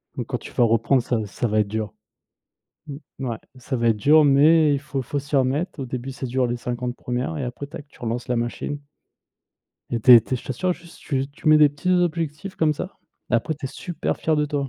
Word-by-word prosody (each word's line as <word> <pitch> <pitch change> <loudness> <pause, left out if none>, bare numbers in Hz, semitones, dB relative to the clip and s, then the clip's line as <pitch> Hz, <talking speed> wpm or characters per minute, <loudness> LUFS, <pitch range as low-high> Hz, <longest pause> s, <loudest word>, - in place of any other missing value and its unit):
donc - - -4
quand - - -2
tu - - -11
vas - - +2
reprendre 115 +3 +3
ça 120 - 0
ça 110 +4 -2
va 110 0 +1
être 105 - +2
dur. 110 -1 -3 0.9
Mmh 145 0 -7 0.3
ouais. 115 - -2 0.2
Ça 130 +1 -4
va 115 -1 +2
être 110 - +1
dur 150 +8 +5
mais 150 +2 +5
il 140 - -1
faut 140 -2 -4
faut 145 +4 -3
s'y 145 +1 -2
remettre. 140 +5 0
Au 135 - -4
début 125 +1 -5
ça 130 0 -5
dure 125 +1 +1
les 120 0 -2
50 120 +1 -4
1ères 125 +6 -3
et 140 - -2
après 125 +3 -6
tac, 145 0 -10
tu - - -22
relances 120 +1 -3
la 125 - +1
machine. 120 +5 -3 1.1
Et 120 - -1
tu 125 - +8
es 120 - +10
tu 120 - -4
es - - +1
je - - -11
t'assure, 180 +8 -1
juste 170 -1 -16
tu 135 -2 -1
tu 145 - -3
mets 155 - +8
des 150 -1 +6
petits 145 +6 -3
objectifs 175 0 -1
comme 155 -1 +2
ça 180 +6 -7 0.3
et - - +1
après 155 +7 +1
tu 150 -1 -11
es - - -1
super 165 +5 -4
fier 160 -1 +1
de 150 - +2
toi. 145 -2 -2
135 Hz, 245 wpm, -23 LUFS, 120-150 Hz, 1.1 s, es